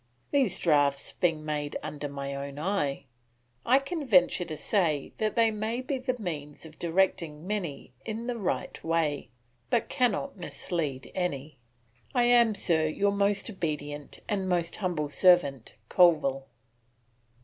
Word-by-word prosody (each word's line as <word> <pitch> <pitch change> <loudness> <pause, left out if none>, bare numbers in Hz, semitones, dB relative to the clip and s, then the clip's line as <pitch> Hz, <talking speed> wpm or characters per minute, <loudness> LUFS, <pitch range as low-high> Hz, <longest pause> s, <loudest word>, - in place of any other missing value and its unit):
These 255 -10 +2
draughts 145 -4 +2
being 160 -3 0
made 150 -1 -2
under 145 0 -5
my 140 0 -5
own 140 0 -6
eye, 150 -5 -1 0.6
I 255 - +6
can 295 +4 -3
venture 180 -4 +4
to 155 -2 -6
say 160 -9 0
they 220 +1 +2
may 220 +3 -2
be 265 +1 -3
the 255 -1 -2
means 155 -8 -6
of 155 -1 -13
directing 170 -3 0
many 180 -11 -4
in 220 +6 -4
the 240 -1 -3
right 195 - -3
way, 160 -5 0 0.4
but 240 -2 +1
cannot 250 0 0
mislead 160 -6 -4
any. 150 -6 -3 0.6
I 245 - +4
am, 240 -2 +5
sir, 160 -5 +2
your 200 +6 +1
most 200 0 +1
obedient 150 -7 -4
and 195 -3 -1
most 170 -2 0
humble 170 -7 -2
servant, 145 - +3
Colville. 140 -6 +3
175 Hz, 140 wpm, -28 LUFS, 150-210 Hz, 0.6 s, I